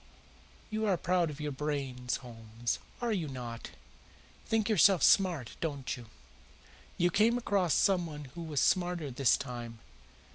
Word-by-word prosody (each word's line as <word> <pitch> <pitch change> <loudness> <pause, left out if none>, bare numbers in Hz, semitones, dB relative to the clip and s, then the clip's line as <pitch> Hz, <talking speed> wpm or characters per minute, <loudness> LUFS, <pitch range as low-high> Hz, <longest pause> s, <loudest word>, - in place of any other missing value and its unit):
"You 215 0 -1
are 190 -3 +2
proud 175 -1 +1
of 150 -1 -8
your 150 -1 -3
brains, 135 -3 -2
Holmes, 115 0 -4 0.2
are 240 -1 0
you 175 -6 -1
not? 120 -4 -6 0.8
Think 225 -2 +1
yourself 195 -5 +5
smart, 175 - +3
don't 140 -5 -2
you? 120 -2 -11 0.9
You 175 +1 +2
came 225 +6 +3
across 200 -8 +1
someone 170 -7 +1
who 170 - -7
was 155 -4 -1
smarter 175 -5 +1
this 125 -1 +3
time. 120 -3 -6
155 Hz, 140 wpm, -31 LUFS, 125-185 Hz, 0.9 s, yourself